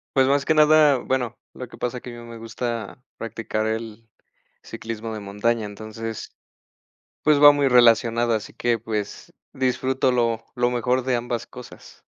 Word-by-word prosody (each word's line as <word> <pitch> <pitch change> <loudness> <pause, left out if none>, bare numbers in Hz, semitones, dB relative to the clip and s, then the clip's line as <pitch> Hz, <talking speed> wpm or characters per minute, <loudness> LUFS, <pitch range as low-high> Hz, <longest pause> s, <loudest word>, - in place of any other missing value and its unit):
Pues 130 -1 +4
más 140 0 +2
que 160 - +3
nada, 150 -2 +5
bueno, 125 -2 -2 0.2
lo 125 - -8
que - - -14
pasa 125 0 -3
que 125 - -10
a - - -8
mí - - -11
me 115 - -9
gusta 115 +1 -5
practicar 115 -1 -3
el 110 0 -5 0.5
ciclismo 115 0 -6
de 110 - -5
montaña, 105 +3 -1
entonces 110 +2 -7 0.8
pues 150 -1 +3
va 145 - +11
muy 145 -1 +1
relacionada, 120 -1 +4
así 105 - -10
que 120 -1 0
pues 105 -2 -5 0.2
disfruto 130 0 0
lo 115 -2 0
lo 120 0 +1
mejor 125 +1 0
de 130 -2 +1
ambas 120 -1 -4
cosas. 125 -1 -13
120 Hz, 165 wpm, -23 LUFS, 115-130 Hz, 0.8 s, va